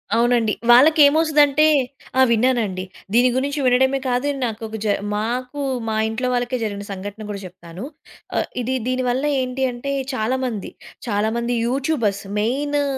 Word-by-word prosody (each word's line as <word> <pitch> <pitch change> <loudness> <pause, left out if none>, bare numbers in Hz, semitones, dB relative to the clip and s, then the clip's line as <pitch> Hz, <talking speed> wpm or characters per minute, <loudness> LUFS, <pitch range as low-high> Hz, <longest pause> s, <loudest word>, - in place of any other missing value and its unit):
అవునండి 235 -2 +2 0.2
వాళ్ళకేమొస్తది 300 +3 +6
అంటే 295 +2 +3 0.5
ఆ! 260 - +6
విన్నానండి. 225 -6 +1 0.3
దీని 245 +2 +5
గురించి 285 +3 -1
వినడమే 265 +2 +3
కాదు, 250 +3 0 0.2
నాకొక 220 -1 -5
జ - - +1 0.3
మాకు 250 +6 -3 0.3
మా 220 - -1
ఇంట్లో 250 +3 -2
వాళ్ళకే 245 +1 -1
జరిగిన 205 -2 -4
సంఘటన 205 +3 -7
కూడా 200 -1 -5
చెప్తాను. 175 +2 -10 0.5
అహ్, - - 0
ఇది 255 +2 -1
దీని 255 0 0
వల్ల 255 +3 0 0.2
ఏంటి 255 +1 -3
అంటే 245 +3 -5 0.2
చాలా 255 +2 0
మంది, 220 -5 -4 0.4
చాలా 210 0 0
మంది 235 +1 -1
యూట్యూబర్స్ 250 -6 -1 0.2
మెయిను 285 +6 0
245 Hz, 145 wpm, -21 LUFS, 220-265 Hz, 0.5 s, వాళ్ళకేమొస్తది